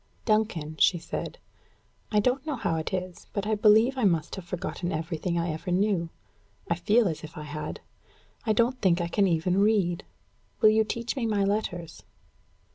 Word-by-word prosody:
"Duncan," 205 Hz, -9 st, 0 dB
she 175 Hz, -, +5 dB
said, 165 Hz, -, -5 dB, 0.7 s
"I 210 Hz, -, +4 dB
don't 255 Hz, +5 st, +1 dB
know 305 Hz, -2 st, -2 dB
how 170 Hz, -9 st, -1 dB
it 160 Hz, -, -3 dB
is, 185 Hz, -1 st, -5 dB
but 200 Hz, -1 st, -2 dB
I 220 Hz, -, 0 dB
believe 220 Hz, +5 st, +4 dB
I -, -, 0 dB
must 170 Hz, -5 st, +1 dB
have 190 Hz, -3 st, -8 dB
forgotten 180 Hz, 0 st, -4 dB
everything 165 Hz, +2 st, -2 dB
I 170 Hz, 0 st, 0 dB
ever 160 Hz, +4 st, -5 dB
knew. 180 Hz, -2 st, +1 dB, 0.6 s
I -, -, +2 dB
feel 210 Hz, +6 st, +3 dB
as 160 Hz, -4 st, -4 dB
if 160 Hz, +3 st, -10 dB
I 150 Hz, -, -5 dB
had. 150 Hz, +1 st, -6 dB, 0.6 s
I 220 Hz, -, +1 dB
don't 240 Hz, +4 st, +1 dB
think 180 Hz, -3 st, +3 dB
I 170 Hz, -, -1 dB
can 195 Hz, +3 st, +2 dB
even 180 Hz, +2 st, +1 dB
read. 200 Hz, -4 st, +2 dB, 0.6 s
Will 215 Hz, -, +7 dB
you 220 Hz, +1 st, +4 dB
teach 235 Hz, +3 st, -3 dB
me 245 Hz, -4 st, -1 dB
my 205 Hz, -2 st, +1 dB
letters?" 195 Hz, -5 st, -2 dB
190 Hz, 185 wpm, -27 LUFS, 170-215 Hz, 0.7 s, Will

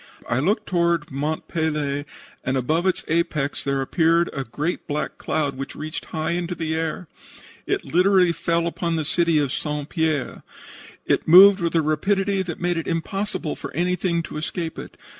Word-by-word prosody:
I 120 Hz, -, +1 dB
looked 190 Hz, +10 st, +1 dB
toward 170 Hz, -3 st, +1 dB
Mont 150 Hz, +4 st, -3 dB
Pelee, 150 Hz, -3 st, -1 dB, 0.4 s
and 130 Hz, 0 st, 0 dB
above 155 Hz, +8 st, +1 dB
its 185 Hz, -, +1 dB
apex 155 Hz, -3 st, 0 dB
there 140 Hz, -1 st, 0 dB
appeared 165 Hz, +3 st, +2 dB
a 135 Hz, -, -3 dB
great 150 Hz, +8 st, -3 dB
black 150 Hz, 0 st, -3 dB
cloud 145 Hz, -3 st, -1 dB
which 135 Hz, -, -5 dB
reached 155 Hz, +1 st, -5 dB
high 160 Hz, +1 st, -3 dB
in 175 Hz, 0 st, -1 dB
the 165 Hz, -3 st, -3 dB
air. 160 Hz, +2 st, -3 dB, 0.6 s
It 400 Hz, -1 st, -1 dB
literally 180 Hz, 0 st, +4 dB
fell 170 Hz, 0 st, 0 dB
upon 170 Hz, 0 st, -1 dB
the 160 Hz, -2 st, -1 dB
city 170 Hz, +1 st, +2 dB
of 145 Hz, -2 st, +1 dB
St. 150 Hz, -1 st, -3 dB
Pierre. 160 Hz, -5 st, -1 dB, 0.6 s
It -, -, +1 dB
moved 190 Hz, +4 st, +9 dB
with 170 Hz, -1 st, -1 dB
a 165 Hz, -, +3 dB
rapidity 195 Hz, +6 st, +1 dB
that 175 Hz, -3 st, -5 dB
made 175 Hz, 0 st, 0 dB
it 165 Hz, -, -3 dB
impossible 175 Hz, 0 st, -2 dB
for -, -, -7 dB
anything 175 Hz, 0 st, 0 dB
to 150 Hz, -, -7 dB
escape 160 Hz, +1 st, -4 dB
it. -, -, -10 dB
165 Hz, 175 wpm, -23 LUFS, 150-175 Hz, 0.6 s, moved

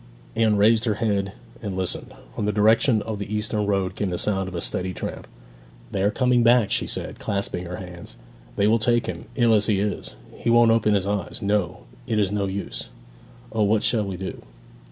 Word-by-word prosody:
Anne 110 Hz, -2 st, +3 dB
raised 110 Hz, +3 st, +4 dB
her 110 Hz, -3 st, +1 dB
head 100 Hz, -3 st, 0 dB, 0.3 s
and 100 Hz, -5 st, -4 dB
listened. 95 Hz, -1 st, -3 dB, 0.2 s
From 105 Hz, -, -2 dB
the -, -, +2 dB
direction 110 Hz, +2 st, +4 dB
of 110 Hz, -2 st, -4 dB
the 100 Hz, 0 st, -5 dB
eastern 105 Hz, -1 st, -1 dB
road 95 Hz, -2 st, 0 dB
came 100 Hz, -, -1 dB
the 90 Hz, -, -2 dB
sound 95 Hz, -1 st, 0 dB
of 95 Hz, -, -7 dB
a -, -, -2 dB
steady 90 Hz, +1 st, -2 dB
tramp. -, -, -5 dB, 0.6 s
'They 95 Hz, -, -1 dB
are 100 Hz, -, +3 dB
coming 125 Hz, +2 st, +2 dB
back!' 115 Hz, -3 st, +4 dB
she -, -, 0 dB
said, -, -, -4 dB
clasping 100 Hz, -3 st, -2 dB
her 90 Hz, -, -5 dB
hands. 85 Hz, -9 st, -9 dB, 0.4 s
'They 100 Hz, -, +2 dB
will 110 Hz, +2 st, +4 dB
take 120 Hz, +1 st, +2 dB
him, 115 Hz, -, -5 dB
ill 120 Hz, -3 st, +4 dB
as 105 Hz, -1 st, +3 dB
he 105 Hz, -3 st, +2 dB
is! 105 Hz, +1 st, -3 dB, 0.2 s
He -, -, -1 dB
won't 120 Hz, -1 st, +6 dB
open 110 Hz, -2 st, +3 dB
his 95 Hz, -2 st, +1 dB
eyes 100 Hz, -1 st, -3 dB
no, 100 Hz, -3 st, 0 dB, 0.3 s
it 110 Hz, -3 st, 0 dB
is 100 Hz, -2 st, +2 dB
no 100 Hz, -1 st, 0 dB
use! 95 Hz, -11 st, -4 dB, 0.6 s
O, 110 Hz, -, -1 dB
what 105 Hz, +1 st, +3 dB
shall 110 Hz, -3 st, +2 dB
we 95 Hz, -2 st, -4 dB
do?' 95 Hz, +1 st, -6 dB
105 Hz, 210 wpm, -24 LUFS, 95-110 Hz, 0.6 s, won't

